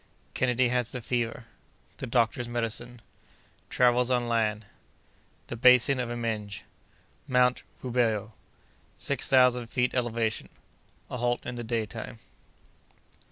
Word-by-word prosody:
—Kennedy 125 -1 +2
has 125 -2 0
the 125 - -5
Fever.—The 115 -1 -5
Doctor's 120 +1 +1
Medicine.—Travels 120 +1 -2
on 125 -1 +1
Land.—The 110 +1 -5
Basin 125 +2 +5
of 125 -1 -2
Imenge.—Mount 120 +3 -2 0.2
Rubeho.—Six 120 +2 -3
Thousand 125 -2 +4
Feet 125 +1 0
Elevation.—A 115 0 -4
Halt 120 0 -1
in 125 - -4
the 120 -1 -5
Daytime. 115 0 -4
120 Hz, 85 wpm, -28 LUFS, 115-125 Hz, 0.2 s, Basin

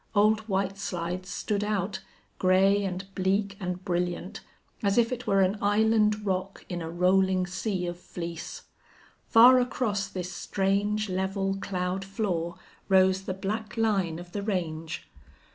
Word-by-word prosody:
Old 215 +1 +5
White 195 0 -1
Slides 180 0 -3
stood 210 -1 -2
out, 205 -2 -1 0.4
gray 195 +2 +4
and 185 0 -3
bleak 195 +1 0
and 180 -1 -4
brilliant, 175 +1 -2 0.4
as 200 -1 +1
if 235 0 +4
it 250 0 -4
were 195 0 +4
an 190 +2 +2
island 210 0 +3
rock 190 0 -2
in 175 -1 -4
a 160 - -4
rolling 185 +2 +3
sea 185 0 -2
of 175 0 -5
fleece. 170 -2 -7 0.6
Far 250 +2 +8
across 215 -5 -1
this 180 -2 -5
strange, 200 +3 0
level 195 +1 -1
cloud 185 0 -2
floor 190 -4 -2 0.3
rose 190 0 +4
the 190 -1 -4
black 210 +3 -4
line 195 -7 +1
of 175 0 -10
the 205 - -3
range. 165 -6 -3
195 Hz, 145 wpm, -28 LUFS, 180-205 Hz, 0.6 s, Far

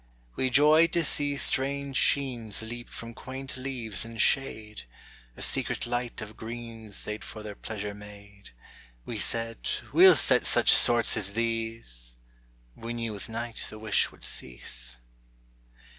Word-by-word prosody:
We 130 - 0
joyed 155 +5 +5
to 170 - +2
see 145 -1 +3
strange 140 +1 0
sheens 120 -8 +1
Leap 120 +2 -8
from 115 0 -7
quaint 130 +3 -8
leaves 130 -5 -3
in 115 0 -9
shade; 110 - 0 0.5
A - - 0
secret - - +1
light 120 0 -3
of 110 0 -9
greens 115 -2 -7
They'd 105 0 -5
for 110 - -8
their 105 -1 -6
pleasure 105 0 -6
made. 100 -1 -13 0.6
We - - -4
said: 115 -1 0 0.2
"We'll 180 +2 +8
set 130 - +6
such - - +5
sorts 120 -1 +4
as 100 0 -2
these!" 115 - -4 0.6
—We 115 +1 -6
knew 115 -2 -4
with 100 - -7
night 115 +1 -4
the 110 - -10
wish 110 -1 +1
would - - -18
cease. - - -4
115 Hz, 145 wpm, -28 LUFS, 105-130 Hz, 0.6 s, We'll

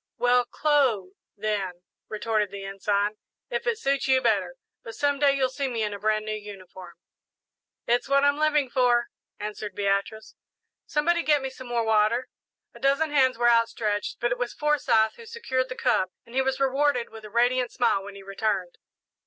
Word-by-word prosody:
'" - - -64
"Well, 245 0 +3
'clo', 255 -10 +1 0.3
then," 200 -4 -3 0.3
retorted 215 -1 -1
the 200 0 -8
Ensign, 200 +1 -1 0.3
"if - - -3
it 470 -1 +1
suits 275 -8 0
you 260 -1 +4
better; 200 -7 0 0.3
but 225 - -9
some 285 -1 0
day 280 -1 +4
you'll 265 -1 +2
see 275 0 -2
me 235 -3 -2
in 210 -1 -2
a 200 - -6
brand 215 +1 0
new 215 - -3
uniform." 190 -4 -10 0.9
"It's 240 +2 +1
what 275 0 +4
I'm 285 +1 +3
living 300 -4 +2
for," 245 -2 +2 0.3
answered 210 -1 -6
Beatrice. 200 +2 -1 0.5
"Somebody 340 +3 +1
get 295 -4 +2
me 265 - -3
some 260 -1 -11
more 240 -1 0
water." 220 +3 +2 0.4
A 235 - -14
dozen 280 +4 +1
hands 260 -4 +3
were 240 0 +2
outstretched, 230 -3 +1
but 240 0 0
it 240 - -1
was 245 -1 -2
Forsyth 265 -7 +2
who 465 - -12
secured 260 - -2
the 255 - -5
cup, 190 -9 +1
and 235 - -16
he 265 - +2
was 265 0 -1
rewarded 270 -2 +1
with 220 -1 -11
a 215 - -9
radiant 245 +2 +1
smile 235 -6 +1
when 200 0 -9
he 200 - -11
returned. 195 -2 -2
240 Hz, 185 wpm, -26 LUFS, 210-270 Hz, 0.9 s, you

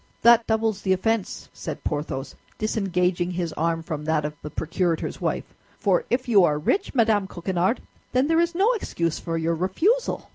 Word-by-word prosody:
"That 235 0 +6
doubles 220 -2 0
the 190 - +2
offense," 225 +2 -1
said - - -6
Porthos, 145 -2 -3 0.2
disengaging 180 -4 0
his 175 -3 -3
arm 165 +1 -1
from 150 -2 -5
that 155 -1 +1
of 150 - -3
the 150 - -6
procurator's 165 +2 -2
wife; - - -2 0.3
"for 480 - +2
if 250 +1 0
you 205 -6 +6
are 150 -3 +3
rich, 380 - 0
Madame 220 -5 +3
Coquenard, 185 +5 -1 0.3
then 255 +2 +3
there 325 +1 +3
is 340 0 0
no 400 +6 +4
excuse 170 - -2
for 165 -1 -3
your 165 +1 0
refusal." 320 - 0
185 Hz, 175 wpm, -24 LUFS, 165-230 Hz, 0.3 s, That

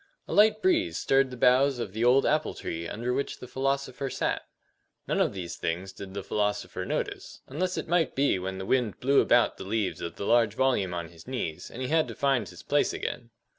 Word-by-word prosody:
A - - -4
light 215 - +5
breeze 345 -2 +2
stirred 135 0 +3
the 125 - -8
boughs 130 +2 +4
of 115 -5 -4
the 110 +2 -1
old 125 +3 +5
apple 155 +1 +1
tree 85 +1 -5
under 120 +6 -2
which 140 - -2
the 125 - -10
philosopher 135 +1 -2
sat. - - -1 0.7
None - - +1
of - - +1
these 90 -3 -6
things 90 +3 -3
did 95 0 -9
the 100 - -4
philosopher 105 +1 -2
notice, - - -4
unless 180 +7 -2
it - - -3
might 165 -4 +1
be 135 -8 +2
when 95 +1 -4
the 95 - -5
wind 120 -2 0
blew 140 +2 +4
about 120 0 +3
the - - -7
leaves 105 0 -2
of 85 -1 -5
the 100 - -5
large 115 -2 +3
volume 115 -9 +1
on 85 -1 -4
his 85 +2 -16
knees, 120 -12 -4
and 130 - -6
he - - -2
had 160 0 +3
to - - -7
find 135 -5 +1
his - - -12
place - - +1
again. 120 - -5
125 Hz, 220 wpm, -28 LUFS, 95-135 Hz, 0.7 s, light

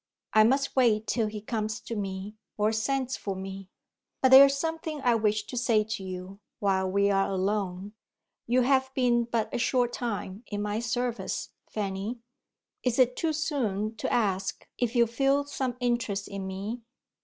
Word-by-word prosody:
I 215 - +7
must 270 +5 +2
wait 225 -5 +3
till 225 -2 0
he 210 0 -6
comes 215 0 -3
to 230 - -6
me, 195 0 -4 0.2
or 210 +1 +2
sends 260 +3 -1
for 195 -2 -4
me. 190 0 -7 0.5
But 260 - +4
there 270 +1 +11
is 275 0 -1
something 320 0 -3
I 245 -2 +4
wish 215 -2 +1
to 250 - -8
say 235 -3 +3
to 215 -2 -5
you, 185 +1 -7 0.2
while 190 -2 +1
we 200 +1 +2
are 195 0 +2
alone. 195 0 -2 0.5
You 250 +2 +3
have 265 +1 +2
been 240 -2 +3
but 230 -2 -2
a - - -1
short 245 -1 +1
time 210 -3 -4
in 205 -1 -3
my 210 +1 -1
service, 235 -3 -2 0.2
Fanny. 200 +3 -3 0.6
Is 250 -2 0
it 250 -1 +4
too 325 - 0
soon 235 -9 -1
to - - -2
ask 195 -4 0
if 245 0 0
you 235 -1 +6
feel 275 +4 +2
some 260 -3 -3
interest 235 -5 -1
in 195 -1 -5
me?" 200 +5 -5
220 Hz, 175 wpm, -28 LUFS, 200-250 Hz, 0.6 s, there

